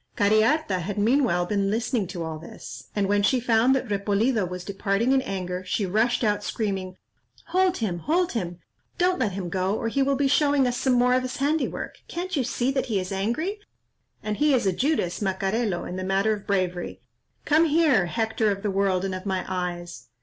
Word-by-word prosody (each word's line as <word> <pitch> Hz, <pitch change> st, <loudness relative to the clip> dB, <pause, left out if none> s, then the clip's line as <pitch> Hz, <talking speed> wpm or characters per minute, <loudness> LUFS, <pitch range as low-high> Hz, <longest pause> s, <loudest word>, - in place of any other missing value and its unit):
Cariharta 215 Hz, -, +3 dB
had 190 Hz, +4 st, -4 dB
meanwhile 220 Hz, -5 st, +2 dB
been 200 Hz, +1 st, 0 dB
listening 225 Hz, -1 st, 0 dB
to 180 Hz, -2 st, -5 dB
all 160 Hz, -1 st, -5 dB
this, 160 Hz, -, -10 dB
and 200 Hz, -2 st, +1 dB
when 205 Hz, +1 st, +2 dB
she 250 Hz, +5 st, +3 dB
found 240 Hz, +2 st, +3 dB
that 260 Hz, -1 st, -2 dB
Repolido 205 Hz, +1 st, +1 dB
was 180 Hz, 0 st, -6 dB
departing 200 Hz, +4 st, 0 dB
in 270 Hz, 0 st, +4 dB
anger, 185 Hz, -5 st, -4 dB
she 195 Hz, +2 st, -1 dB
rushed 220 Hz, +7 st, +1 dB
out, 210 Hz, -1 st, +1 dB
screaming, 190 Hz, -4 st, -3 dB, 0.5 s
"Hold 370 Hz, +1 st, +2 dB
him, 185 Hz, -7 st, -2 dB
hold 340 Hz, -, +1 dB
him,—don't 230 Hz, -, -3 dB
let 215 Hz, -7 st, 0 dB
him 185 Hz, -2 st, -4 dB
go, 190 Hz, +3 st, -1 dB
or 230 Hz, -, -2 dB
he 275 Hz, +4 st, 0 dB
will 275 Hz, +1 st, +2 dB
be 280 Hz, +1 st, +2 dB
showing 285 Hz, -1 st, +3 dB
us 245 Hz, -1 st, 0 dB
some 260 Hz, +1 st, +1 dB
more 250 Hz, 0 st, +4 dB
of 255 Hz, -, +3 dB
his 255 Hz, 0 st, -5 dB
handiwork; 295 Hz, +3 st, -1 dB
can't 360 Hz, +1 st, -4 dB
you 275 Hz, -, +1 dB
see 245 Hz, +2 st, 0 dB
that 270 Hz, -1 st, -1 dB
he 215 Hz, -5 st, 0 dB
is 185 Hz, +1 st, -5 dB
angry? 240 Hz, -, -2 dB, 0.6 s
and 210 Hz, -1 st, -2 dB
he 295 Hz, -2 st, +4 dB
is 240 Hz, -, 0 dB
a 190 Hz, -, +2 dB
Judas 250 Hz, -, 0 dB
Macarelo 195 Hz, 0 st, -1 dB
in 180 Hz, -, -5 dB
the 185 Hz, -, -3 dB
matter 195 Hz, +3 st, +1 dB
of 205 Hz, -2 st, -7 dB
bravery. 185 Hz, -3 st, -1 dB, 0.5 s
Come 310 Hz, +3 st, +4 dB
here, 300 Hz, -, +3 dB
Hector 220 Hz, +2 st, 0 dB
of 200 Hz, -1 st, -2 dB
the 205 Hz, -, 0 dB
world 195 Hz, -1 st, +1 dB
and 190 Hz, -, -2 dB
of 185 Hz, +2 st, -6 dB
my 190 Hz, -1 st, -1 dB
eyes!" 175 Hz, -2 st, -4 dB
210 Hz, 200 wpm, -25 LUFS, 190-260 Hz, 0.6 s, in